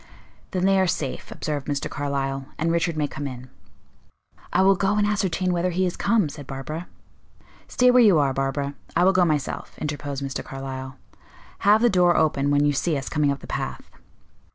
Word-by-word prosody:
"Then 185 Hz, -1 st, -1 dB
they 195 Hz, 0 st, +4 dB
are 190 Hz, -, +3 dB
safe," 140 Hz, -6 st, -3 dB
observed 145 Hz, -3 st, -4 dB
Mr. 145 Hz, -1 st, -2 dB
Carlyle, 135 Hz, -1 st, -3 dB
"and 165 Hz, +2 st, 0 dB
Richard 170 Hz, -1 st, 0 dB
may 150 Hz, -1 st, +1 dB
come 145 Hz, 0 st, -5 dB
in." 125 Hz, -1 st, -9 dB, 1.0 s
"I -, -, +3 dB
will 195 Hz, +1 st, +6 dB
go 195 Hz, +2 st, +1 dB
and 205 Hz, -, +3 dB
ascertain 190 Hz, -3 st, 0 dB
whether 175 Hz, +1 st, 0 dB
he 185 Hz, +2 st, 0 dB
is 180 Hz, -, -2 dB
come," 220 Hz, -7 st, +2 dB
said 145 Hz, -1 st, -9 dB
Barbara. 150 Hz, +6 st, -6 dB, 0.8 s
"Stay 250 Hz, 0 st, +4 dB
where 250 Hz, 0 st, +6 dB
you 205 Hz, -7 st, +6 dB
are, 140 Hz, -2 st, +2 dB
Barbara; 135 Hz, +1 st, -2 dB, 0.2 s
I 175 Hz, -, +4 dB
will 190 Hz, +1 st, +5 dB
go 185 Hz, -1 st, +4 dB
myself," 150 Hz, -4 st, -2 dB
interposed 145 Hz, -2 st, -4 dB
Mr. 135 Hz, -1 st, -4 dB
Carlyle. 135 Hz, 0 st, -7 dB, 0.6 s
"Have 210 Hz, +3 st, +4 dB
the -, -, +6 dB
door 180 Hz, -2 st, +4 dB
open 145 Hz, -3 st, +2 dB
when 145 Hz, 0 st, +3 dB
you 145 Hz, -, +2 dB
see 155 Hz, +2 st, 0 dB
us 135 Hz, -, -5 dB
coming 150 Hz, -2 st, +1 dB
up 140 Hz, -, -4 dB
the -, -, -10 dB
path." -, -, -5 dB
150 Hz, 195 wpm, -24 LUFS, 140-185 Hz, 1.0 s, will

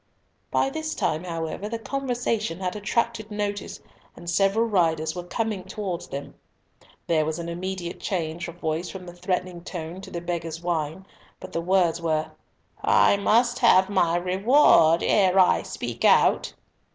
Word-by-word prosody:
By 270 Hz, -, +1 dB
this 315 Hz, +1 st, -4 dB
time, 160 Hz, +3 st, -1 dB
however, 165 Hz, +4 st, -4 dB
the 230 Hz, -, -3 dB
conversation 235 Hz, -7 st, -2 dB
had 185 Hz, 0 st, -3 dB
attracted 220 Hz, +1 st, -1 dB
notice, 205 Hz, -1 st, -4 dB, 0.3 s
and 175 Hz, -, -12 dB
several 195 Hz, +6 st, +2 dB
riders 165 Hz, -6 st, +1 dB
were 180 Hz, -, -3 dB
coming 210 Hz, +1 st, -3 dB
towards 190 Hz, -2 st, -5 dB
them. 140 Hz, +1 st, -7 dB, 0.7 s
There 160 Hz, -2 st, +2 dB
was 155 Hz, +1 st, -2 dB
an 170 Hz, -1 st, -5 dB
immediate 175 Hz, 0 st, -5 dB
change 170 Hz, -3 st, -3 dB
of 170 Hz, -, -8 dB
voice 165 Hz, 0 st, -3 dB
from 190 Hz, -2 st, -8 dB
the 175 Hz, -, -9 dB
threatening 180 Hz, -1 st, -3 dB
tone 175 Hz, 0 st, -6 dB
to -, -, -10 dB
the 170 Hz, -, -4 dB
beggar's 170 Hz, -2 st, -4 dB
whine; 170 Hz, +1 st, -3 dB, 0.3 s
but -, -, -10 dB
the 165 Hz, -, -1 dB
words 175 Hz, -2 st, +2 dB
were—"I 160 Hz, +4 st, 0 dB
must 235 Hz, +4 st, +2 dB
have 190 Hz, -5 st, +5 dB
my 175 Hz, -4 st, +2 dB
reward 180 Hz, -, +4 dB
ere 190 Hz, -2 st, +3 dB
I 185 Hz, -1 st, +5 dB
speak -, -, -6 dB
out." -, -, +4 dB
180 Hz, 150 wpm, -25 LUFS, 170-205 Hz, 0.7 s, have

